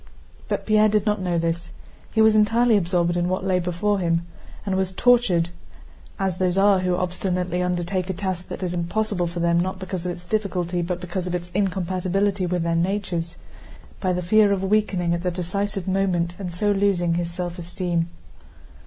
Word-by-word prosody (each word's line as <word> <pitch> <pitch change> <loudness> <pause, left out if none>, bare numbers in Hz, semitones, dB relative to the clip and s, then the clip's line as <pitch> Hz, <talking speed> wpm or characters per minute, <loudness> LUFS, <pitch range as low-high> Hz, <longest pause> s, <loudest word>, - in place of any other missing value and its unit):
But - - -2
Pierre 215 0 +4
did 210 0 +1
not 210 -2 +1
know 180 -2 0
this; 170 +1 -1 0.4
he 220 - +4
was 220 0 +5
entirely 225 +2 +4
absorbed 175 -2 +1
in 175 0 0
what 185 +1 -1
lay 185 -1 +2
before 180 +4 0
him, 170 -1 0 0.4
and 195 -2 0
was 190 0 0
tortured—as 190 -3 0
those 185 0 +1
are 195 -1 +5
who 180 -1 +1
obstinately 180 0 -1
undertake 180 +1 -1
a - - 0
task 185 -1 -3
that - - -6
is 180 -1 -2
impossible 180 +1 -1
for 170 0 -4
them 170 0 +3
not 185 +2 -1
because 185 -2 -5
of - - -1
its 175 0 -9
difficulty 180 -4 -1
but 175 +1 -2
because 180 +1 -4
of 180 - -1
its 175 0 -5
incompatibility 190 0 0
with 175 -1 0
their 170 0 0
natures—by 180 0 -4
the 180 0 -1
fear 210 +3 +4
of 195 -1 0
weakening 195 -4 +1
at 170 - -1
the 180 - 0
decisive 190 +2 -3
moment 185 -3 +1
and 185 -3 -4
so 205 +5 0
losing 195 -4 +2
his 170 0 -1
self 175 0 -5
esteem. 175 -1 -2
180 Hz, 180 wpm, -23 LUFS, 175-195 Hz, 0.4 s, was